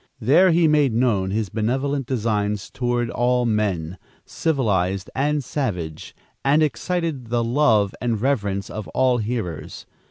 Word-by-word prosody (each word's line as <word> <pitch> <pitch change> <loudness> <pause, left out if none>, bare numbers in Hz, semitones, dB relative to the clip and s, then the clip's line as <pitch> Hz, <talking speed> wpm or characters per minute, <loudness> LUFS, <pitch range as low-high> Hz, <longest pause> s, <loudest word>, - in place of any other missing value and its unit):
There 160 - +5
he 165 -1 +4
made 145 -6 +3
known 110 -6 +1
his 105 0 -1
benevolent 130 +6 -1
designs 105 -4 -1
toward 120 -1 -1
all 125 0 +1
men, 95 -6 -1 0.3
civilized 100 - -1
and 145 +1 0
savage, 90 - -4 0.3
and 145 +3 +4
excited 160 -4 -2
the 120 0 0
love 115 -5 +2
and 115 -3 0
reverence 105 -6 -1
of 105 -5 -6
all 130 -1 +3
hearers. 105 -8 -4
120 Hz, 130 wpm, -22 LUFS, 105-135 Hz, 0.3 s, There